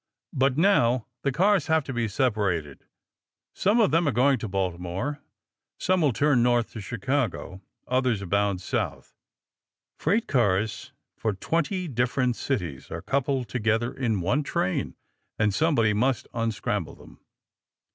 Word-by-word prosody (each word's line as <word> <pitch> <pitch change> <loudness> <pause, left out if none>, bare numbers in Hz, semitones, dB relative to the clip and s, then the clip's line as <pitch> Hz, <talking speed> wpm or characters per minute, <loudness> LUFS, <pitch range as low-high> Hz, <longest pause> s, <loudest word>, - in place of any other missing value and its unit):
But 135 0 +2
now 130 - +3 0.2
the 140 - 0
cars 195 +7 +2
have 160 -1 +3
to 135 - -6
be 120 -2 0
separated. 100 - -1 0.7
Some 205 +5 +2
of 215 - +4
them 165 +1 +3
are - - +3
going 130 +3 +3
to 115 - -4
Baltimore. 95 +8 -3 0.6
Some 185 -1 +1
will 150 -4 +3
turn 140 0 +3
north 120 -1 +2
to 110 - -6
Chicago. 110 -3 -2 0.3
Others 125 -5 +1
are - - -5
bound 100 0 0
south. 90 - -3 0.9
Freight 205 +9 +1
cars 105 -4 0 0.2
for 110 -2 -1
twenty 170 - -1
different 125 -1 0
cities 90 - -3
are - - -6
coupled 135 -2 0
together 115 0 0
in 115 -7 -1
one 100 - +1
train, 95 -9 -1 0.4
and 105 -2 +2
somebody 115 -7 +2
must 125 +4 0
unscramble 115 -2 -2
them. - - -16
120 Hz, 140 wpm, -26 LUFS, 105-140 Hz, 0.9 s, of